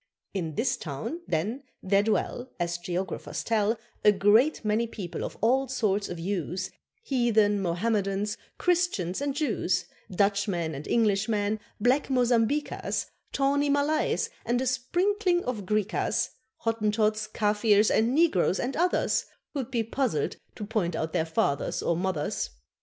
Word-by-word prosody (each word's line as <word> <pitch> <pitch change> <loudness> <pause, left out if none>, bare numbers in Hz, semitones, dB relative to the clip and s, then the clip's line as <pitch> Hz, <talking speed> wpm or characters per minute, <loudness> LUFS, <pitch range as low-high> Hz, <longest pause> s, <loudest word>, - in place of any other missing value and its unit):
In 165 -6 -3
this 250 - +1
town, 155 - -5
then, 205 - -1 0.2
there 195 +1 +4
dwell, 225 +4 -1
As 175 0 -1
geographers 180 +2 -3
tell, 225 0 +1 0.3
A 210 - +8
great 215 +8 +3
many 215 +2 +1
people 195 -6 -5
of - - -5
all 265 +4 +3
sorts 210 -6 0
of 175 - -5
hues, 180 0 -2 0.3
Heathen, 220 - +2
Mohammedans, 195 +2 0 0.2
Christians 340 - +1
and 285 -1 -1
Jews, 215 - 0 0.2
Dutchmen 195 -4 +1
and 140 +1 -7
Englishmen, 215 -1 +1 0.2
black 250 +7 +2
Mozambiquas, 250 +2 +1 0.2
Tawny 285 +1 +2
Malays, 305 +10 +1
and 245 +1 +1
a 260 - -1
sprinkling 350 - +1
of 215 -7 -3
Griquas, 210 0 0 0.3
Hottentots, 215 -1 +1
Kafirs, 210 0 +3
and 235 +4 +2
Negroes 245 - +3
and 255 +2 -2
others, 355 +3 +1 0.3
Who'd 270 -5 -3
be 235 -3 0
puzzled 225 - -1 0.2
to 210 - -5
point 200 -6 -1
out 160 0 -2
their 160 - +1
fathers 140 -3 0
or 170 - +1
mothers. 175 -3 -1
215 Hz, 135 wpm, -28 LUFS, 190-255 Hz, 0.3 s, A